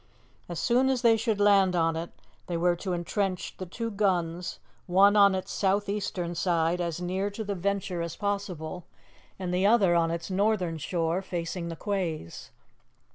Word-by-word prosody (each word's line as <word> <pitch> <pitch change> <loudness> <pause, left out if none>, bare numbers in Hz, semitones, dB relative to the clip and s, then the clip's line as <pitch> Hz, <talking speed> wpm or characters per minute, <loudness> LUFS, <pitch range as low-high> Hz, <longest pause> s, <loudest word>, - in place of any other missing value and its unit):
As 170 -2 -4
soon 250 +8 +3
as 260 -2 0
they 230 -1 +6
should 220 -2 -1
land 200 -3 +4
on 165 -1 +2
it, 165 +1 -4 0.4
they 175 - -2
were 175 +1 +2
to 185 +2 -4
entrench 185 +2 -2
the 185 - -6
two 230 +5 -4
guns, 180 -4 -1 0.3
one 195 +3 +5
on 200 -2 +6
its 185 - -4
south 200 +1 +1
eastern 190 -4 -2
side, 175 0 +1
as 170 -1 -2
near 185 +3 -1
to 205 +2 -5
the 205 -1 -3
Venture 195 -1 -2
as 170 -1 -4
possible, 185 -4 -3 0.5
and 180 -2 -3
the 185 +2 +3
other 205 -5 +4
on 165 -1 +3
its 170 +3 -4
northern 185 -4 +1
shore, 165 +3 -1
facing 175 -1 -4
the 165 - -5
quays. 165 - -4
185 Hz, 175 wpm, -28 LUFS, 170-200 Hz, 0.5 s, they